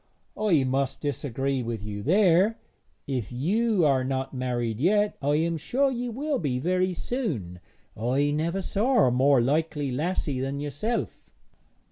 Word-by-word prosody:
'I 180 -10 +2
must 130 +1 -1
disagree 135 -1 -2
with 115 -3 -4
you 105 -1 -5
there. 190 - +3 0.5
If 130 -6 -3
you 190 - +1
are 135 -3 +3
not 135 +1 -2
married 120 -3 -2
yet, 205 +7 +2
I 145 +1 +1
am 165 +2 0
sure 270 - +1
you 245 -1 -3
will 280 +4 -2
be 135 -6 -1
very 185 +6 +1
soon. 155 - -3 0.4
I 130 +6 +1
never 170 +6 -1
saw 230 +5 +2
a 125 - +3
more 130 +1 +4
likely 145 +1 0
lassie 145 -1 -1
than 135 +2 -3
yourself.' 145 - -3
145 Hz, 145 wpm, -26 LUFS, 130-190 Hz, 0.5 s, more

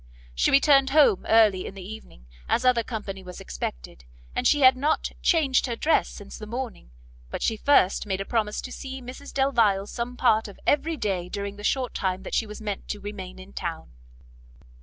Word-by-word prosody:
She - - +2
returned 275 -1 +5
home 280 -9 +4
early 215 -4 +4
in 195 - -9
the 190 -1 -8
evening, 210 - -11 0.2
as 250 - +1
other 250 -2 +4
company 210 -4 -6
was 180 -1 -10
expected, - - -6 0.3
and - - +1
she 290 - +3
had 260 -1 +7
not 290 +4 0
changed 285 -7 +3
her 235 - -2
dress 310 +7 +2
since 205 -2 -10
the 215 - -8
morning; 235 - -6 0.4
but - - -4
she 225 - +1
first 215 -5 +3
made 190 -1 -1
a 195 - -3
promise 215 -2 -1
to 255 - -8
see 265 0 -6
Mrs 255 +3 -9
Delvile 230 -8 +2
some 240 +3 -5
part 225 -3 +3
of 200 - -12
every 315 +2 +1
day 185 -7 -2
during 200 +1 -4
the 205 - -11
short 255 +2 0
time 190 0 -2
that - - -8
she 225 - +1
meant 210 -1 -6
to 210 - -4
remain 200 -2 -7
in 185 +1 -12
town. 165 - -5
215 Hz, 195 wpm, -25 LUFS, 195-260 Hz, 0.4 s, had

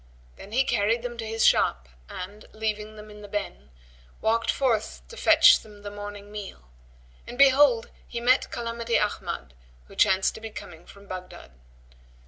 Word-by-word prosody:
Then 200 - -12
he 255 +4 +3
carried 230 -2 +1
them 240 -1 -5
to 225 - -4
his 225 0 +1
shop 60 -1 +3 0.2
and, 200 +4 -8
leaving 215 0 -3
them 210 0 -11
in 210 0 -12
the 205 - -9
"ben"[FN#127] 195 - -5 0.5
walked 230 +1 +1
forth 240 -6 0
to 470 - -10
fetch 325 -4 +6
them 210 -1 -15
the 205 - -6
morning 205 0 -8
meal, 195 - -9 0.6
and 245 - -8
behold 270 -3 +5 0.2
he 235 - -5
met 250 +2 +3
Calamity 235 0 -2
Ahmad 210 - -3 0.3
who - - -15
chanced 190 0 +3
to 220 - -10
be 225 - -6
coming 175 -5 -11
from 200 0 -15
Baghdad. 185 - -9
215 Hz, 165 wpm, -26 LUFS, 205-235 Hz, 0.6 s, fetch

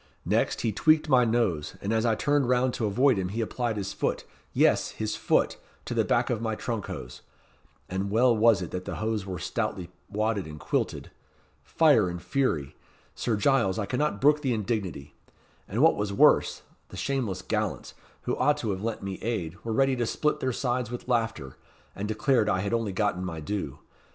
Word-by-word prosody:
Next, - - +1
he 115 - 0
tweaked 155 +7 +3
my 125 -3 +5
nose, 110 -10 0
and 100 +3 -2
as 110 +1 +2
I 110 - +3
turned 145 0 +1
round 125 0 +2
to 115 -4 -1
avoid 120 +2 +3
him, 90 -1 -2
he 110 +5 -4
applied 115 0 -2
his 100 -1 -3
foot - - -1 0.3
yes, - - +3
his 110 0 -3
foot - - +1 0.3
to - - -4
the - - +2
back - - +1
of 115 -2 -1
my 110 -1 -1
trunk 115 -2 -4
hose; 60 - -7 0.7
and 95 +2 -2
well 120 +3 +4
was 110 -3 +4
it 85 - -7
that 90 0 -4
the - - -4
hose 110 -2 -2
were 95 -1 -4
stoutly 90 +2 -3 0.2
wadded 105 -3 -1
and 75 -1 -9
quilted. - - -2 0.5
Fire 145 - +3
and 85 0 -5
fury! 85 - -1 0.4
Sir 115 - -1
Giles, 105 -4 +2
I 105 - -1
cannot 125 -1 -1
brook 150 +2 +4
the 130 -5 0
indignity. 100 -9 -3 0.5
And 115 +8 0
what 160 - +6
was 105 -1 -2
worse, 100 - +4 0.3
the - - -10
shameless 115 -10 -2
gallants, 105 0 -2 0.3
who - - -1
ought 150 0 +3
to 110 -7 -2
have 95 0 -4
lent 110 -1 -3
me 95 -1 -5
aid, 95 -8 -2
were 115 - -3
ready 135 +3 +3
to 120 -2 0
split 150 +5 0
their 130 - 0
sides 125 -1 -1
with 120 0 -7
laughter, 115 - -1 0.4
and 100 - -4
declared 110 +1 +2
I 95 - +1
had 100 +3 -2
only 115 -3 0
gotten 95 -2 0
my 85 -3 -4
due. 80 -4 -4
110 Hz, 195 wpm, -27 LUFS, 95-125 Hz, 0.7 s, what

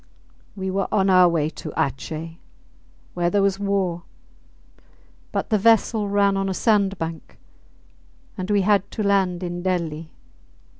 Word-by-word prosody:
We 190 -1 -3
were 195 +1 -1
on 195 -2 +2
our 185 -1 +6
way 160 -3 0
to - - -8
Atjeh, 160 +3 -3 0.7
where 175 -1 0
there 200 +2 +2
was 195 0 +1
war; 195 -4 -1 1.3
but - - -3
the 215 - +3
vessel 220 -1 +3
ran 200 -1 +2
on 195 0 -1
a 190 - -2
sandbank, 195 -7 -1 1.0
and 185 -1 -5
we 205 -1 +3
had 200 0 +2
to 215 - -4
land 190 -3 +1
in 175 0 -4
Delli. 165 -4 -2
190 Hz, 140 wpm, -22 LUFS, 175-200 Hz, 1.3 s, our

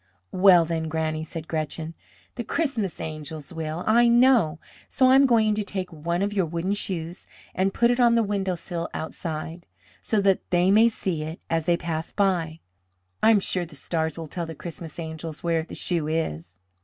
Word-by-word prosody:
"Well, 180 -3 +6
then, 160 -1 -2
Granny," 155 0 -2
said 160 0 -7
Gretchen, 160 +1 -3 0.4
"the 240 - -4
Christmas 230 - -2
angels 155 0 -6
will, 160 +1 -4
I 235 +2 +5
know; 235 -9 +4 0.3
so 260 - +3
I 260 - +6
am 270 +1 +6
going 220 -3 +3
to 210 0 -1
take 190 -3 -5
one 170 +4 -2
of 205 +1 -1
your 190 -4 +1
wooden 170 +4 -2
shoes, 175 -4 -4 0.3
and 190 +1 +1
put 235 +4 +3
it 245 - 0
on 240 -1 +5
the 230 - +3
windowsill 185 -4 -3
outside, 160 +1 -5 0.3
so 215 - 0
that 195 -1 +3
they 180 +1 +3
may 220 +3 +6
see 185 -7 -3
it 160 +2 -6
as 165 -1 0
they 170 -1 +3
pass 165 -1 -4
by. 170 -5 0 0.6
I - - +5
am 220 -2 +6
sure 185 -2 -1
the 160 -3 -10
stars 160 +3 -2
will 165 - -5
tell 170 +2 -5
the 160 - -7
Christmas 165 0 -7
angels 160 0 -6
where 165 -1 +1
the 160 - -9
shoe 170 -4 -1
is." 90 - -3
170 Hz, 190 wpm, -25 LUFS, 160-200 Hz, 0.6 s, Well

